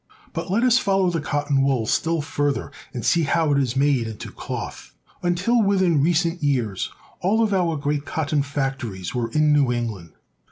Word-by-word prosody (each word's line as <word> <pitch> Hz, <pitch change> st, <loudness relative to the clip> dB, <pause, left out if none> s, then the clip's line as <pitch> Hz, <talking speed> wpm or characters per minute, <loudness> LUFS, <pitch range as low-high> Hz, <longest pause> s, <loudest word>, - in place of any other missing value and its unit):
But 165 Hz, -1 st, -4 dB
let 215 Hz, +6 st, +1 dB
us 255 Hz, 0 st, +5 dB
follow 195 Hz, -4 st, +2 dB
the 165 Hz, -2 st, -1 dB
cotton 145 Hz, -2 st, 0 dB
wool 135 Hz, -4 st, +1 dB
still 165 Hz, +7 st, +1 dB
further, 145 Hz, -2 st, -1 dB, 0.2 s
and 120 Hz, -, -5 dB
see 170 Hz, -, +3 dB
how 160 Hz, 0 st, +1 dB
it 140 Hz, -, +3 dB
is 130 Hz, -2 st, 0 dB
made 135 Hz, -4 st, +2 dB
into 110 Hz, -2 st, -7 dB
cloth. -, -, -7 dB, 0.3 s
Until 185 Hz, +7 st, +2 dB
within 190 Hz, -7 st, +3 dB
recent 170 Hz, +2 st, +1 dB
years 125 Hz, -9 st, 0 dB, 0.3 s
all 215 Hz, +5 st, +2 dB
of 210 Hz, -2 st, +1 dB
our 175 Hz, -4 st, +1 dB
great 145 Hz, 0 st, -1 dB
cotton 150 Hz, -1 st, -1 dB
factories 135 Hz, -9 st, -3 dB
were 120 Hz, -2 st, -1 dB
in 150 Hz, +4 st, +3 dB
New 140 Hz, -4 st, +3 dB
England. 110 Hz, -9 st, -4 dB
145 Hz, 175 wpm, -23 LUFS, 135-175 Hz, 0.3 s, us